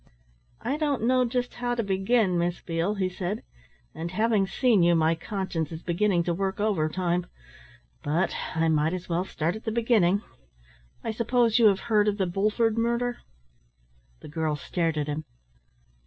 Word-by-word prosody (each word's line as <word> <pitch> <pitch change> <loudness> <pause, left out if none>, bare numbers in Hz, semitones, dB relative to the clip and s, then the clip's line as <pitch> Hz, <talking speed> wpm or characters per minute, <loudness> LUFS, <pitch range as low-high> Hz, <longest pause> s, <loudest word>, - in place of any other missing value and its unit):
"I 270 +5 -1
don't 255 -4 +1
just 245 -1 -1
know - - -16
how 245 0 -1
to 230 - -1
begin, 195 -1 +2
Miss 175 0 -1
Beale," 170 +5 -1
he 190 -2 0
said. 185 +3 -4 0.5
"And 165 +1 -5
having 215 +1 +1
seen 235 -2 +3
you, 170 0 +4
my 160 0 +3
conscience 170 -3 -3
is 160 +1 -7
beginning 175 0 +1
to 170 - 0
work 190 +2 -2
overtime. 180 -3 0 0.7
But 160 +6 0 0.2
I 165 0 +2
might 160 +2 +2
as 180 0 -7
well 175 +2 0
start 165 0 -2
at 220 - -8
the 220 - -2
beginning. 215 -4 +2 0.8
I - - -2
suppose 235 +1 +2
you 225 - +7
have 195 -2 +3
heard 215 -2 +2
of 205 -1 +1
the 190 - +1
Bulford 215 +5 +1
murder?" 235 +1 0 1.0
The - - -10
girl 155 0 -1
stared 165 +2 -2
at 150 - 0
him. 150 +1 -3
190 Hz, 170 wpm, -26 LUFS, 170-225 Hz, 1.0 s, you